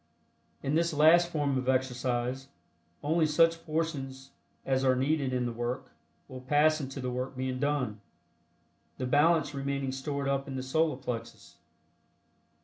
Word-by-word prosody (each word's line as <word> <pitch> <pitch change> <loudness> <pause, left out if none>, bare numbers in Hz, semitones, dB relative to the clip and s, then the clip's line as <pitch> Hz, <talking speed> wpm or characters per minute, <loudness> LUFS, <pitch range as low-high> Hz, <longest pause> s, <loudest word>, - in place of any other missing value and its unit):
In 140 - -1
this 170 +1 +2
last 165 +3 +6
form 145 -5 0
of 130 0 -2
exercise, 130 0 -1 0.6
only 160 +2 +2
such 165 +2 +3
portions 135 -4 -3 0.3
as 135 0 +1
are 130 -1 +4
needed 135 +1 0
in 125 -1 0
the 120 - -2
work 120 +2 -4 0.4
will 130 -1 -9
pass 150 +4 +3
into 135 0 -6
the 125 -1 -3
work 125 +2 -4
being 130 0 -2
done, 130 -7 -1 1.0
the 130 - -3
balance 150 +3 +3
remaining 140 -1 -2
stored 140 +1 -3
up 140 0 -1
in 135 - -5
the 130 - -3
Solar 155 +1 +1
Plexus. 115 -5 -7
135 Hz, 145 wpm, -30 LUFS, 130-150 Hz, 1.0 s, last